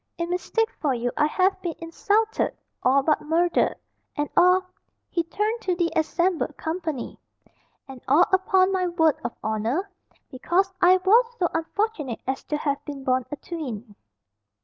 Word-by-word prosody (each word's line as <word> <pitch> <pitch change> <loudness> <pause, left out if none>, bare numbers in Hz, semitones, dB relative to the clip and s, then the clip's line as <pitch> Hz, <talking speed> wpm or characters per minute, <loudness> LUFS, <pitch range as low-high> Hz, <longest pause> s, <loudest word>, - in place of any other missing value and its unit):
In 340 0 -3
mistake 445 +5 0
for 280 -4 0
you 240 +1 -2
I 295 - +3
have 375 +4 +1
been 345 -3 -3
insulted, 415 +7 0 0.2
all 270 +2 +3
but 305 +1 +2
murdered, 335 +3 +1 0.4
and 295 0 -1
all" 365 +1 +5 0.5
he 340 - +1
turned 425 +7 -2
to 365 -4 0
the 345 -1 0
assembled 340 +2 0
company 320 -5 -4 0.7
"and 265 -2 -10
all, 300 +7 +5
upon 375 0 +3
my 370 -1 0
word 320 -4 +2
of 240 - -4
honour, 230 - -1 0.4
because 360 +8 0
I 365 +1 +6
was 410 +7 +5
so 350 - +1
unfortunate 325 - -2
as 265 +1 -3
to 300 - -2
have 290 -1 -2
been 285 -2 -7
born 255 -1 0
a - - -4
twin." 250 - -7
335 Hz, 155 wpm, -24 LUFS, 280-370 Hz, 0.7 s, I